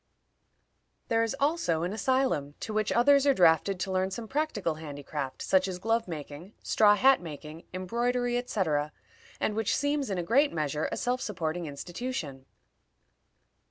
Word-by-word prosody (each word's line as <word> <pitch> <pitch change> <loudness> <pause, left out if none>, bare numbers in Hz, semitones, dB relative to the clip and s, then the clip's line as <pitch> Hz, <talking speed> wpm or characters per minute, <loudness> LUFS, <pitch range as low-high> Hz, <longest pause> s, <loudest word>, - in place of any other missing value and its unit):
There 225 0 +3
is 230 +2 0
also 280 - +1
an 180 +3 -2
asylum 220 - 0
to 220 - -4
which 215 0 0
others 280 +4 +4
are 275 - +5
drafted 175 +2 +4
to 190 - -2
learn 185 0 +1
some 220 +4 -6
practical 265 - -1
handicraft, 145 -2 -5
such 190 0 +3
as 185 -1 -4
glove 225 +3 0
making, 160 +3 -8
straw 210 -1 +5
hat 265 +2 +5
making, 155 0 -9
embroidery, 240 +6 -1
etc., 160 -11 -1 0.5
and 215 - 0
which 220 -2 +1
seems, 285 -2 0
in 195 - -2
a 175 - -1
great 275 - +3
measure, 150 -1 -1
a - - -3
self 250 +1 -1
supporting 175 -5 -3
institution. 150 - -6
195 Hz, 155 wpm, -29 LUFS, 160-245 Hz, 0.5 s, are